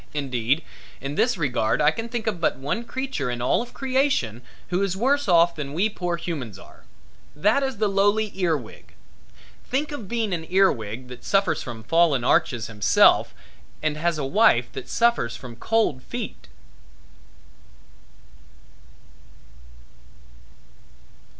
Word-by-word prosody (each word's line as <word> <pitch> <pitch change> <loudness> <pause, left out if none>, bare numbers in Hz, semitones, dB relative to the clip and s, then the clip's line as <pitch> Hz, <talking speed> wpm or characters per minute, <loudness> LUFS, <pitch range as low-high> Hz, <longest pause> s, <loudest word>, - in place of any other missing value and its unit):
Indeed 135 +1 0 0.4
in 140 +1 -5
this 240 +8 +1
regard 120 -8 0
I 150 0 +5
can 225 +7 -6
think 235 -2 -4
of 200 -6 -2
but - - +2
one 140 - -3
creature 260 - -3
in 120 -1 -3
all 125 - +1
creation 260 - 0 0.3
who 180 +2 0
is 195 -1 -1
worse 280 +5 +1
off 170 -1 +5
than 145 -2 -5
we 200 +6 +2
poor 175 -4 -3
humans 145 - -5
are. - - -16 0.5
That 210 - +2
is 265 -4 -2
the 215 0 +1
lowly 205 +2 +2
ear 175 -5 +1
wig. 115 -5 -13 0.7
Think 280 +4 -2
of 235 -9 -6
being 225 -2 -1
an 160 -2 -4
ear 190 +1 +5
wig, 110 +3 -6
that 125 0 -10
suffers 195 0 +1
from 115 -3 -7
fallen 160 -1 +3
arches 120 -2 +2
himself 105 -3 +3 0.5
and 155 -1 0
has 165 +1 0
a 145 - -2
wife 135 - +3
that - - -8
suffers 235 - +1
from 125 -3 -10
cold 215 - 0
feet! 60 - -7
170 Hz, 140 wpm, -24 LUFS, -, 0.7 s, I